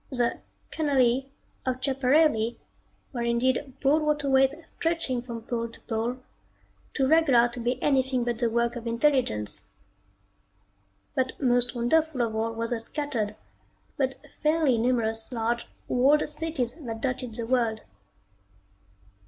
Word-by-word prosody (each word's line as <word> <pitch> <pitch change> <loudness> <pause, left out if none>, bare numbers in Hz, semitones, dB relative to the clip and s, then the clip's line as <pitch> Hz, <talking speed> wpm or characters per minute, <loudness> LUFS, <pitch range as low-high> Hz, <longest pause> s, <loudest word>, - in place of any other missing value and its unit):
The 245 -3 0 0.3
canali 270 -4 +2 0.4
of 255 -1 -1
Schiaparelli 265 -3 +2 0.6
were 240 - -3
indeed 255 +3 0
broad 295 +3 +3
waterways 280 -2 +2
stretching 325 -7 -1
from 235 -2 -7
pole 230 0 -3
to - - -12
pole, 230 +2 -2 0.8
too 270 - +2
regular 275 -6 +5
to 240 - -7
be 245 +2 -1
anything 265 -3 +2
but 235 -1 -2
the 235 -1 +2
work 235 +1 0
of 235 -1 -6
intelligence. 230 - +1 1.5
But 260 -2 -1
most 245 -2 +2
wonderful 270 +3 +2
of 225 -2 -2
all 225 +1 0
were 230 0 -2
the 235 -1 -2
scattered, 230 -4 -2 0.6
but 265 -1 0 0.3
fairly 305 -6 +3
numerous 225 -2 0
large, 235 0 -1 0.2
walled 275 +5 +3
cities 300 -5 -2
that 225 -3 -5
dotted 255 -2 -3
the 230 - -3
world. 230 -3 +1
250 Hz, 130 wpm, -27 LUFS, 235-275 Hz, 1.5 s, regular